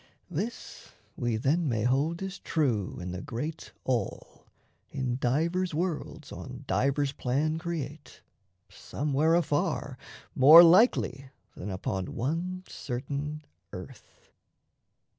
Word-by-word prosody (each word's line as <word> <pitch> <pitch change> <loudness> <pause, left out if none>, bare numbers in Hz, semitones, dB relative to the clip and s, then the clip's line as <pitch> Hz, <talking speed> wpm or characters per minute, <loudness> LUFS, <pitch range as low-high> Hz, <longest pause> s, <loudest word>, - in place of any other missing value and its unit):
This 210 +9 -5 0.2
We, 120 -2 -1
then, 150 +7 +1
may 110 -3 0
hold 145 +8 +1
as 195 0 -5
true 120 - -1
in 90 0 -5
the 90 - -5
great 145 +4 -5
All, 120 -6 -3 0.4
In 130 -3 -2
divers 165 +7 0
worlds 170 -1 -3
on - - -8
divers 140 +1 +1
plan 145 +5 -1
create, 165 -3 -6 0.4
Somewhere 150 +3 0
afar 150 -5 0 0.3
more 155 +6 +10
likely 165 - +4 0.3
than 95 - -6
upon 95 0 -3
One 170 +9 -2
certain 145 +4 -5 0.3
earth.) 90 -2 -11
145 Hz, 105 wpm, -29 LUFS, 125-165 Hz, 0.4 s, more